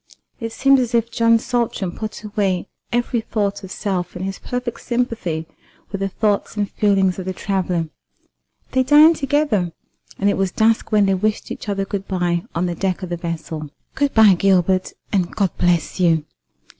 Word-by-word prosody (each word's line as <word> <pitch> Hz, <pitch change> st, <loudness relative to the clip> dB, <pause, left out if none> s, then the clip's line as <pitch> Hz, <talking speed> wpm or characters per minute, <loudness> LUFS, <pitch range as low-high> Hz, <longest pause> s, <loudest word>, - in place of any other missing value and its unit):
It 230 Hz, -2 st, -4 dB
seemed 275 Hz, +4 st, +4 dB
as 245 Hz, -1 st, 0 dB
if 230 Hz, 0 st, +1 dB
John 230 Hz, 0 st, +4 dB
Saltram 225 Hz, -6 st, -1 dB
put 215 Hz, +3 st, -6 dB
away 200 Hz, -3 st, -1 dB, 0.2 s
every 240 Hz, -1 st, 0 dB
thought 205 Hz, -2 st, -2 dB
of 190 Hz, -, -8 dB
self 185 Hz, -3 st, -3 dB
in 180 Hz, -, -5 dB
his 195 Hz, 0 st, -4 dB
perfect 245 Hz, -1 st, -4 dB
sympathy 230 Hz, -10 st, -2 dB, 0.5 s
with 195 Hz, -1 st, -4 dB
the 195 Hz, -, 0 dB
thoughts 210 Hz, +1 st, -1 dB
and 205 Hz, -1 st, +1 dB
feelings 195 Hz, -3 st, +2 dB
of 185 Hz, -, -5 dB
the 185 Hz, -, -2 dB
traveller. 185 Hz, -4 st, -1 dB, 0.8 s
They 260 Hz, -, +3 dB
dined 300 Hz, +5 st, +6 dB
together, 275 Hz, -, +1 dB, 0.4 s
and 200 Hz, -, +1 dB
it 200 Hz, -, +2 dB
was 195 Hz, -1 st, 0 dB
dusk 225 Hz, +2 st, +2 dB
when 210 Hz, -2 st, +4 dB
they 195 Hz, -, +2 dB
wished 210 Hz, +3 st, -1 dB
each -, -, -6 dB
other 195 Hz, -1 st, -1 dB
good 195 Hz, 0 st, -4 dB
bye 175 Hz, -2 st, 0 dB
on 170 Hz, +2 st, +1 dB
the 175 Hz, -, -1 dB
deck 185 Hz, +2 st, -2 dB
of 180 Hz, -, -5 dB
the 175 Hz, -, -1 dB
vessel. 160 Hz, -3 st, -5 dB, 0.2 s
"Good 285 Hz, 0 st, 0 dB
bye, 220 Hz, -3 st, +8 dB
Gilbert, 185 Hz, 0 st, +2 dB, 0.2 s
and 185 Hz, -3 st, 0 dB
God 195 Hz, -5 st, 0 dB
bless 175 Hz, 0 st, +1 dB
you! 165 Hz, -4 st, +3 dB
200 Hz, 180 wpm, -20 LUFS, 180-230 Hz, 0.8 s, bye